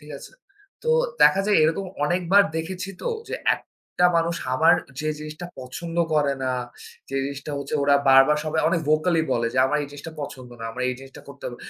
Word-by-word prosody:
ঠিক 150 Hz, 0 st, -14 dB
আছে? -, -, -12 dB, 0.5 s
তো 475 Hz, -, +1 dB, 0.3 s
দেখা 195 Hz, -, +6 dB
যায় 210 Hz, -, +4 dB
এরকম 165 Hz, +5 st, +1 dB, 0.2 s
অনেকবার 180 Hz, +5 st, +4 dB
দেখেছি 185 Hz, +4 st, -4 dB
তো, -, -, -1 dB, 0.2 s
যে -, -, -2 dB, 0.2 s
একটা 180 Hz, -, -5 dB
মানুষ 170 Hz, 0 st, +1 dB, 0.2 s
আমার 155 Hz, +5 st, +5 dB, 0.3 s
যে 155 Hz, -, -2 dB
জিনিসটা 155 Hz, +3 st, -7 dB
পছন্দ 165 Hz, +7 st, -7 dB, 0.2 s
করে 145 Hz, -2 st, +2 dB
না, 130 Hz, -, 0 dB, 0.6 s
যে 135 Hz, -, -2 dB
জিনিসটা 140 Hz, +1 st, -6 dB
হচ্ছে 140 Hz, +1 st, -5 dB
ওরা 140 Hz, 0 st, +4 dB, 0.2 s
বারবার 135 Hz, +3 st, +6 dB
সবাই 160 Hz, 0 st, 0 dB
অনেক 170 Hz, 0 st, +1 dB
ভোকালি 160 Hz, +2 st, +3 dB
বলে 115 Hz, 0 st, 0 dB
যে, -, -, +1 dB
"আমার 150 Hz, +3 st, 0 dB
এই 145 Hz, -, -6 dB
জিনিসটা 145 Hz, +3 st, -9 dB
পছন্দ 130 Hz, -3 st, -8 dB
না, -, -, -5 dB
আমার 125 Hz, +2 st, -4 dB
এই 125 Hz, -, -1 dB
জিনিসটা 135 Hz, 0 st, -12 dB
করতে 140 Hz, 0 st, -12 dB
হবে। 120 Hz, -, -6 dB
150 Hz, 195 wpm, -24 LUFS, 135-170 Hz, 0.6 s, দেখা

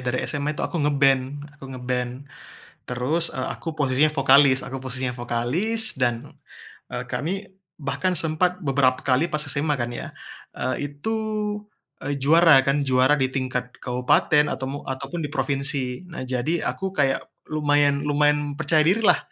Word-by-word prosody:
dari 125 Hz, 0 st, -1 dB
SMA 145 Hz, 0 st, -2 dB
itu -, -, -2 dB
aku 170 Hz, -, -2 dB
nge-band, 140 Hz, -1 st, +2 dB
aku -, -, -11 dB
nge-band. 125 Hz, +1 st, -3 dB, 0.6 s
Terus, 135 Hz, +8 st, -1 dB
e -, -, -4 dB
aku 165 Hz, -, -4 dB
posisinya 150 Hz, 0 st, +2 dB
vokalis, 135 Hz, -1 st, +5 dB
aku 135 Hz, -, -6 dB
posisinya 130 Hz, -1 st, -4 dB
vokalis 140 Hz, -, -1 dB
dan, 120 Hz, -2 st, -1 dB, 0.5 s
eee, 125 Hz, 0 st, -4 dB
kami, 190 Hz, +9 st, -3 dB, 0.3 s
bahkan 150 Hz, +5 st, -1 dB
sempat 170 Hz, +4 st, +1 dB
beberapa 130 Hz, -2 st, +3 dB
kali 135 Hz, +6 st, +2 dB
pas 150 Hz, 0 st, -2 dB
SMA 145 Hz, 0 st, -1 dB
kan 120 Hz, 0 st, -3 dB
ya, -, -, -6 dB, 0.5 s
eee, 140 Hz, +2 st, -2 dB
itu, 220 Hz, +10 st, -2 dB, 0.9 s
e 140 Hz, 0 st, -2 dB
juara 160 Hz, +2 st, +6 dB
kan 140 Hz, +1 st, +2 dB
juara 130 Hz, +1 st, +3 dB
di 130 Hz, -1 st, +1 dB
tingkat 130 Hz, -2 st, -3 dB
kabupaten 130 Hz, +4 st, +2 dB
ataumu 135 Hz, +2 st, -4 dB
ataupun 140 Hz, +5 st, -4 dB
di 145 Hz, -, -5 dB
provinsi. 135 Hz, +1 st, -2 dB
Nah 170 Hz, -5 st, -8 dB
jadi 130 Hz, +7 st, 0 dB
aku 190 Hz, 0 st, -2 dB
kayak 135 Hz, -4 st, +1 dB, 0.2 s
lumayan 145 Hz, -1 st, +2 dB
lumayan 150 Hz, 0 st, +2 dB
percaya 155 Hz, +1 st, +2 dB
diri 195 Hz, +7 st, +3 dB
lah. 215 Hz, -, +5 dB
140 Hz, 150 wpm, -24 LUFS, 130-155 Hz, 0.9 s, juara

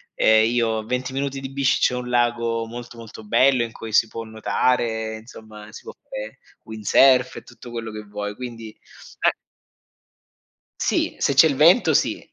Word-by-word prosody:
ehm, 110 Hz, 0 st, +4 dB
io 115 Hz, -2 st, 0 dB
20 125 Hz, +2 st, -3 dB
minuti 135 Hz, 0 st, -3 dB
di 135 Hz, 0 st, -7 dB
bici 135 Hz, -1 st, +1 dB
c'è -, -, +2 dB
un 125 Hz, 0 st, -5 dB
lago 120 Hz, -1 st, 0 dB
molto, 120 Hz, +1 st, -10 dB
molto 110 Hz, -1 st, -11 dB
bello 125 Hz, +3 st, +3 dB
in 115 Hz, -, -6 dB
cui 115 Hz, -, -9 dB
si 115 Hz, -, +4 dB
può 115 Hz, +1 st, -7 dB
nuotare, 110 Hz, 0 st, -1 dB
insomma 110 Hz, -2 st, -13 dB
si -, -, -11 dB
può -, -, -9 dB
fare 105 Hz, +1 st, -9 dB, 0.3 s
windsurf 125 Hz, +4 st, +3 dB
e -, -, -7 dB
tutto 120 Hz, -, -14 dB
quello 115 Hz, -1 st, -6 dB
che 105 Hz, 0 st, -7 dB
vuoi, 105 Hz, 0 st, -6 dB
quindi 115 Hz, -2 st, -8 dB, 0.5 s
eh. -, -, +2 dB, 1.5 s
Sì, 325 Hz, -2 st, 0 dB
se 140 Hz, -, +1 dB
c'è 150 Hz, +4 st, +7 dB
il 140 Hz, -, -2 dB
vento 170 Hz, -, +5 dB
sì. -, -, 0 dB
115 Hz, 170 wpm, -22 LUFS, 110-125 Hz, 1.5 s, c'è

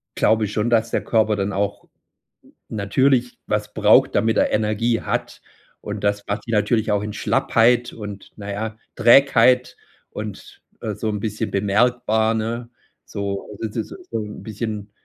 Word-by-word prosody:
glaube 110 Hz, -1 st, +2 dB
schon, 105 Hz, +3 st, -1 dB
dass 115 Hz, -1 st, +2 dB
der -, -, 0 dB
Körper 110 Hz, -2 st, +2 dB
dann 100 Hz, +1 st, -1 dB
auch 100 Hz, +1 st, -2 dB, 0.8 s
natürlich 125 Hz, +4 st, +1 dB
was 105 Hz, 0 st, -2 dB
braucht, 105 Hz, 0 st, +4 dB
damit 115 Hz, -1 st, +2 dB
er -, -, +2 dB
Energie 110 Hz, +2 st, +1 dB
hat. -, -, -3 dB, 0.4 s
Und 105 Hz, 0 st, -6 dB
das 100 Hz, 0 st, 0 dB
macht 100 Hz, +3 st, -3 dB
ihn 115 Hz, -, -3 dB
natürlich 110 Hz, +1 st, +1 dB
auch 105 Hz, 0 st, +1 dB
in 105 Hz, -, -4 dB
Schlappheit 120 Hz, +3 st, +2 dB
und, 105 Hz, -2 st, -8 dB
na 100 Hz, -1 st, -6 dB
ja, 110 Hz, +2 st, -4 dB, 0.2 s
Trägheit 125 Hz, 0 st, +5 dB, 0.3 s
und, 105 Hz, -2 st, -8 dB, 0.2 s
äh, -, -, -3 dB
so 110 Hz, -, -3 dB
'n 105 Hz, -1 st, -2 dB
bisschen 110 Hz, +1 st, -3 dB
bemerkbar, 110 Hz, +2 st, +2 dB
ne, 115 Hz, +2 st, -3 dB, 0.4 s
so. 100 Hz, -1 st, -4 dB
Also 110 Hz, +2 st, -5 dB
das 105 Hz, -, -13 dB
ist 110 Hz, -, -4 dB, 0.2 s
so 115 Hz, -, -1 dB
'n 105 Hz, -1 st, -7 dB
bisschen, 105 Hz, -1 st, -5 dB
110 Hz, 160 wpm, -22 LUFS, 105-115 Hz, 0.8 s, Trägheit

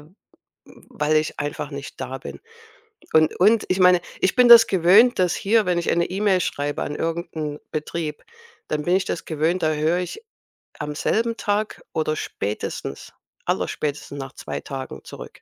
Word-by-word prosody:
w -, -, -16 dB, 0.9 s
weil 150 Hz, +1 st, 0 dB
ich 155 Hz, 0 st, -2 dB
einfach 145 Hz, 0 st, -4 dB
nicht 140 Hz, -1 st, -8 dB
da 130 Hz, 0 st, -5 dB
bin. 135 Hz, -, -9 dB, 0.7 s
Und 155 Hz, 0 st, +4 dB
und 210 Hz, +4 st, +4 dB
ich 185 Hz, -, +1 dB
meine, 180 Hz, -1 st, +6 dB, 0.2 s
ich 185 Hz, -, +2 dB
bin 250 Hz, -1 st, +5 dB
das 230 Hz, -1 st, +10 dB
gewöhnt, 195 Hz, +7 st, +5 dB
dass 180 Hz, -2 st, +3 dB
hier, 215 Hz, +1 st, +2 dB
wenn 180 Hz, -1 st, +1 dB
ich 170 Hz, -, -2 dB
eine 170 Hz, 0 st, +2 dB
E-Mail 190 Hz, 0 st, +1 dB
schreibe 145 Hz, -3 st, -2 dB
an 145 Hz, -, -4 dB
irgend 165 Hz, +2 st, -3 dB
'n 150 Hz, -1 st, -4 dB
Betrieb 155 Hz, 0 st, -4 dB, 0.5 s
dann 150 Hz, -1 st, -1 dB
bin 175 Hz, +4 st, +2 dB
ich 190 Hz, -, +2 dB
das -, -, -4 dB
gewöhnt, 165 Hz, +3 st, 0 dB
da 155 Hz, 0 st, +2 dB
höre 155 Hz, +3 st, +1 dB
ich 180 Hz, -, -5 dB, 0.6 s
am 150 Hz, 0 st, -4 dB
selben 230 Hz, +8 st, 0 dB
Tag 205 Hz, +1 st, -2 dB
oder 155 Hz, -1 st, 0 dB
spätestens, 105 Hz, -7 st, -5 dB, 0.3 s
allerspätestens 145 Hz, -1 st, -3 dB
nach 135 Hz, -1 st, -7 dB
2 -, -, -6 dB
Tagen 135 Hz, -1 st, -7 dB
zurück. -, -, -11 dB
165 Hz, 170 wpm, -23 LUFS, 150-190 Hz, 0.9 s, das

